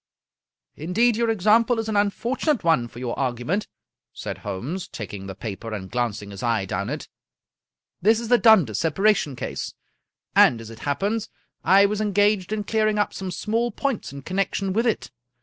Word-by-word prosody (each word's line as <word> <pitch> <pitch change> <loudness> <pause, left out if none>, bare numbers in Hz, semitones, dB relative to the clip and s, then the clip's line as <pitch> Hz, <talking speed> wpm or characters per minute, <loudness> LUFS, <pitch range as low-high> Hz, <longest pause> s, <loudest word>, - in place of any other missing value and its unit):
" - - -60
Indeed 230 +6 +3
your 230 +1 +1
example 225 +3 +3
is 225 0 -2
an 215 - -2
unfortunate 230 - 0
one 160 -8 +3
for 120 - -15
your 120 -1 -4
argument," 130 - -1 0.5
said - - -6
Holmes, 145 - -4
taking 100 -3 -7
the 95 - -7
paper, 110 +2 -5
and 95 -2 -7
glancing 110 -4 -2
his 100 - -8
eye 115 -5 +1
down 95 +1 -3
it. - - -5 0.5
" 65 +3 -62
This 220 +4 +4
is 235 - -5
the 245 +1 +5
Dundas 180 - +5
separation 165 -3 +2
case, - - -5 0.6
and, 120 - +6
as 115 0 -9
it 115 - -11
happens, 205 +9 -1 0.3
I 195 +1 +6
was 210 +1 0
engaged 205 -1 +2
in 215 -1 -1
clearing 215 0 +1
up 205 - +1
some 190 -1 -5
small 225 +6 -1
points 270 - -3
in 140 0 -9
connection 195 +1 -1
with 230 +4 +1
it. 225 - -1
190 Hz, 180 wpm, -24 LUFS, -, 0.6 s, and